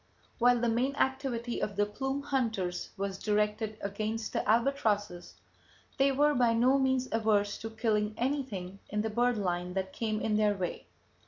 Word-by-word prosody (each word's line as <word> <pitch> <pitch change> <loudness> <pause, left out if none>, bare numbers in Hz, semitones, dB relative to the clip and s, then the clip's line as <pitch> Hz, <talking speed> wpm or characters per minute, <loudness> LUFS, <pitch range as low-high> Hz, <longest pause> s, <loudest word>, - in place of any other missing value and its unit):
"While 245 0 +5
the 240 - +2
main 250 +5 +1
activity 265 -4 -1
of 205 - -2
the 205 +1 +2
plume 270 +6 -3
hunters 225 -10 -1
was 195 -1 -3
directed 210 +1 0
against 215 +3 -3
the - - 0
albatrosses, 215 -7 +1 0.6
they 275 +1 +5
were 295 +2 +3
by 240 -3 +3
no 255 +4 +4
means 260 -1 +1
averse 215 -2 +1
to 225 - -5
killing 215 -1 0
anything 235 -8 -2
in 210 +1 -1
the 220 0 -2
bird 240 +1 +2
line 180 -2 -2
that 190 0 -2
came 215 -2 -1
in 215 -1 0
their 210 -1 +3
way. 180 -3 -4
220 Hz, 165 wpm, -30 LUFS, 205-250 Hz, 0.6 s, While